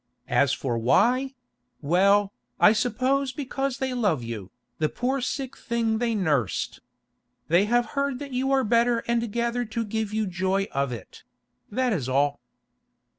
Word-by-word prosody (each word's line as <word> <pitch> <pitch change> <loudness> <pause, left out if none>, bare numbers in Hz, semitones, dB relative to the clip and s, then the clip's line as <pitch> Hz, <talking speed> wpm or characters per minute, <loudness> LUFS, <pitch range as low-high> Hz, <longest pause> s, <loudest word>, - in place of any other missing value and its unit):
As 140 -2 +4
for 120 -5 -1
why—well, 195 - +1 0.3
I 210 - +7
suppose 260 +4 0
because 270 -1 -3
they 265 -1 -2
love 205 - +1
you, 110 -5 -6 0.3
the 155 -1 +1
poor 260 +2 -1
sick 265 +1 -3
thing 230 -2 -1
they 230 -1 0
nursed. 145 - 0 0.7
They 175 +5 +4
have 240 +2 +2
heard 280 -2 0
that 280 0 -8
you 265 +2 0
are 270 -1 +3
better 235 +1 +2
and 235 -2 0
gather 235 +2 0
to 230 +1 -3
give 220 0 -2
you 215 0 0
joy 190 +1 0
of 140 -1 -1
it; 115 -6 -9 0.5
that 250 +2 0
is 135 -9 -2
all." 140 +1 +1
220 Hz, 150 wpm, -25 LUFS, 160-250 Hz, 0.7 s, I